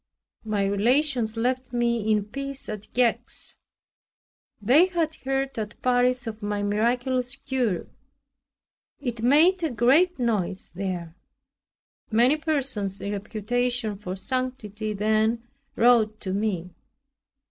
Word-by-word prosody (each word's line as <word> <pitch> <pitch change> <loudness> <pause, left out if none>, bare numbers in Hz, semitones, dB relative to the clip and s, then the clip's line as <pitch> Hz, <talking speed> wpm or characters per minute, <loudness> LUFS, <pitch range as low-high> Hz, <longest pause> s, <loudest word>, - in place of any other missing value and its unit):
My 210 -2 0
relations 230 +3 +1
left 255 +2 -1
me 235 -2 +1
in 210 -2 +2
peace 275 +4 -6
at 215 -1 -7
Gex. 245 -2 -1 1.0
They 270 - +5
had 335 -4 -1
heard 270 -1 -2
at 210 0 -6
Paris 250 0 +3
of 220 -1 -6
my 205 0 -2
miraculous 245 +5 0
cure; 255 -9 -1 1.1
it 240 -5 -4
made 315 +10 +4
a 325 - 0
great 280 +9 +3
noise 210 -7 -1
there. 180 -3 -4 1.0
Many 240 +7 +4
persons 265 - -1
in 200 - -4
reputation 225 +2 -1
for 190 -2 -6
sanctity 215 -3 -3
then 220 +3 +1 0.3
wrote 225 -2 +4
to 185 - -3
me. 190 -4 -2
235 Hz, 115 wpm, -25 LUFS, 210-260 Hz, 1.1 s, They